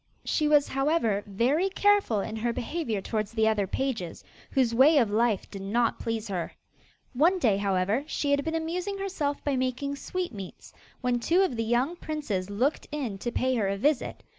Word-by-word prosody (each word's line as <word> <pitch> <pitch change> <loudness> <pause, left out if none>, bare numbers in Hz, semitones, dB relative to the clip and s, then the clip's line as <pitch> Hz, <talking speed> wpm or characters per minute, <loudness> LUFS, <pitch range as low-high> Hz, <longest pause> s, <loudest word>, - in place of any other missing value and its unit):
She 305 - +1
was, 295 -1 +4
however, 270 -7 +1
very 260 - +1
careful 400 - +3
in 220 - -5
her 235 +2 0
behaviour 235 - -3
towards 215 +1 -3
the 220 -1 +2
other 210 -3 +1
pages, 225 -7 -3 0.3
whose 255 -4 +2
way 280 +6 +6
of 230 -7 +3
life 220 -2 +1
did 195 - -7
not 225 +4 0
please 225 -1 -3
her. 180 -3 -3 0.6
One 330 +9 +4
day, 225 - +2
however, 200 +5 +1
she 290 -2 -1
had 285 0 +2
been 320 +2 -2
amusing 355 +5 -2
herself 335 -8 -2
by 285 -2 0
making 260 +2 -2
sweetmeats, 265 - -6 0.3
when 250 -1 +1
two 345 +10 +3
of 320 -10 0
the 225 - -1
young 245 +8 +1
princes 230 - -3
looked 245 +9 0
in 255 -10 -3
to 240 - -3
pay 260 +1 0
her 220 -5 +1
a 200 0 -1
visit. 285 +5 0
250 Hz, 185 wpm, -27 LUFS, 215-300 Hz, 0.6 s, way